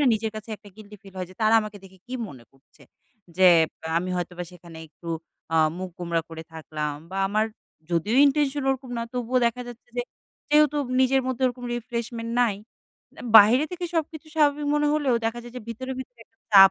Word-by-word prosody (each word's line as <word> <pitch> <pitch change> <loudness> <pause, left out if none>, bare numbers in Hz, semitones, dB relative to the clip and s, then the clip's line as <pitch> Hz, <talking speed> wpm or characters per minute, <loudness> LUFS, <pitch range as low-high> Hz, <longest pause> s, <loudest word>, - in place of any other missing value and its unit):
না, - - +4
নিজের 220 +1 -2
কাছে 215 +1 -8
একটা 205 - -16
গিল্টি 210 -1 -12
ফিল 195 -1 -15
হয় 180 -1 -4
যে, - - -14
তারা 215 +1 +5
আমাকে 215 -1 -7
দেখে 190 0 -16
কী 250 - -6
মনে 125 -6 -12
করছে? 135 0 -25 0.5
যে, 190 - +4 0.5
আমি 185 +2 -3
হয়তোবা 180 0 -4
সেখানে 170 -2 -12
একটু 170 +2 -12 0.5
আ - - +4 0.2
মুখ 185 0 -5
গোমড়া 170 -2 -1
করে 160 0 -7
থাকলাম 155 -2 -4 0.2
বা 190 - -5
আমার 215 +2 +2 0.5
যদিও 185 +8 +1
intention 285 0 +2
ওরকম 265 -1 -3
না, 230 - -1
তবুও 250 0 0
দেখা 235 +2 -1
যাচ্ছে 240 0 -12
যে, 245 - +1 0.5
যেহেতু 300 -1 +5 0.2
নিজের 265 0 +4
মধ্যে 260 0 -2
ওরকম 245 0 -4
refreshment 235 -1 -4
নাই, 230 -5 +2 0.6
অ্যা - - -11
বাইরে 225 +7 +8
থেকে 360 0 -4
সবকিছু 315 -1 -2
স্বাভাবিক 295 -1 +3
মনে 295 0 +2
হলেও 290 -5 +2
দেখা 230 +1 -1
যায় 240 0 -11
যে, 250 - -5
ভিতরে, 260 +3 -5
ভিতরে 245 -2 -9
একটা 225 - -46
চাপ 195 -1 +10
230 Hz, 195 wpm, -25 LUFS, 185-260 Hz, 0.6 s, চাপ